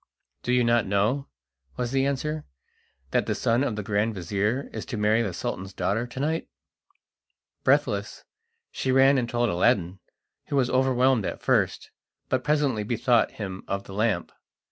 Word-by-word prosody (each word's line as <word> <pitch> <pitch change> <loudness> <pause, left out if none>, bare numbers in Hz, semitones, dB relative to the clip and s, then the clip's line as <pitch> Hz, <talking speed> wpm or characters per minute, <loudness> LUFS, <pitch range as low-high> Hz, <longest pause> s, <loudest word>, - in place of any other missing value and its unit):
"Do 125 - -2
you 125 0 +4
not 115 -2 +2
know," 105 +8 +1 0.5
was 120 -1 -2
the 135 0 +2
answer, 150 +3 -2 0.7
"that - - +1
the - - 0
son 115 +3 +1
of 120 -6 -1
the 105 - -4
grand 105 +2 0
vizir 100 - -1
is - - -4
to 120 - -4
marry 105 +2 +3
the 105 -5 -1
Sultan's 95 +2 -5
daughter 115 +5 0
to 125 - -8
night?" 160 +4 -1 1.2
Breathless, - - +1 0.5
she 130 - -1
ran 135 +1 +5
and 120 -1 -2
told 120 0 +1
Aladdin, 90 +1 +1 0.5
who - - -2
was 130 -3 +2
overwhelmed 130 -3 +3
at - - -6
first, - - +1 0.4
but 130 -1 0
presently 145 -7 +1
bethought 120 +2 +2
him 95 -3 -6
of 100 0 -2
the 100 - -11
lamp. 110 +2 0
120 Hz, 165 wpm, -26 LUFS, 105-130 Hz, 1.2 s, ran